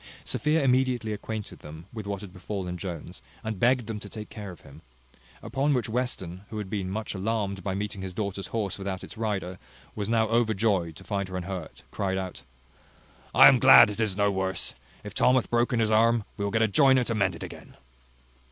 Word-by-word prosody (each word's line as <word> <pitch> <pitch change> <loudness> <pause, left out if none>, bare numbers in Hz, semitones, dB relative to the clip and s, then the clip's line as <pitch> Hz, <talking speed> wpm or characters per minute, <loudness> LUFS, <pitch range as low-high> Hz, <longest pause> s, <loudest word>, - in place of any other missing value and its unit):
Sophia 150 +1 +1
immediately 125 -4 +2
acquainted 105 0 -6
them 80 +2 -10
with 110 -3 -6
what 100 -1 -3
had 100 -3 -10
befallen 90 -1 -4
Jones, 85 -3 -7 0.2
and 110 -3 -4
begged 125 +1 +3
them 110 -1 -4
to 100 - -9
take 105 0 -8
care 105 -3 -7
of 90 - -11
him. 70 +3 -14 0.6
Upon 140 +2 +1
which 125 - 0
Western, 110 -7 -3
who 110 - -6
had 100 -3 -5
been 95 -3 -2
much 110 +3 -3
alarmed 100 -1 -2
by 95 0 -2
meeting 100 -1 -4
his 95 -1 -5
daughter's 100 -1 -3
horse 100 -4 -2
without 95 -1 -4
its - - -10
rider, 105 -5 -2
and 90 - -9 0.4
was 105 -1 -3
now 115 -1 +3
overjoyed 110 -7 +1
to - - -12
find 100 -2 -2
her 95 - -4
unhurt, 90 -2 -6
cried 95 -1 -1
out, 95 -1 -5 0.9
"I - - +10
am - - +6
glad - - +9
it 105 - -7
is 105 -4 0
no 100 0 +3
worse. 95 -1 -2 0.3
If 105 -1 -7
Tom 125 +3 +4
hath 130 - 0
broken 120 0 +2
his 110 -1 +2
arm, 115 +1 +4
we 100 - -4
will 100 - -1
get 115 +1 +2
a - - +4
joiner 130 +3 +5
to 115 - -1
mend 105 -3 +1
un - - -6
again." - - -12
105 Hz, 210 wpm, -27 LUFS, 95-115 Hz, 0.9 s, I